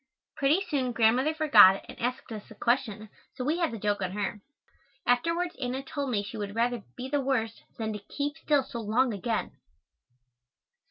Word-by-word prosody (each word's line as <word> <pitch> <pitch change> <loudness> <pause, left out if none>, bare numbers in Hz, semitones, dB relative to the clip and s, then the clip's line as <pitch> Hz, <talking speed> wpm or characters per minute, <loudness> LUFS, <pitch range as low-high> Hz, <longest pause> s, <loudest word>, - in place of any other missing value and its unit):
Pretty 310 +7 +2
soon 260 -6 -1
Grandmother 245 +7 +3
forgot 210 - +7
and - - -11
asked 250 0 -3
us 215 -2 -7
a - - -12
question, 235 -4 0 0.3
so 255 - -4
we 315 +5 +1
had 335 -3 +2
the 230 - -5
joke 205 -1 -1
on 185 -1 -2
her. 205 0 -3 0.6
Afterwards 335 +8 +1
Anna 255 +1 -2
told 280 0 -4
me 210 -5 0
she 205 +3 -7
would 205 -1 -5
rather 240 0 +1 0.2
"be 255 +1 -5
the 285 +1 0
worst," 245 -5 -1 0.2
than 220 -1 -2
to 210 - -5
keep 285 +8 -4
still 295 -3 +1
so 235 - -7
long 230 +3 +1
again. 220 +3 -2
245 Hz, 180 wpm, -28 LUFS, 215-280 Hz, 0.6 s, forgot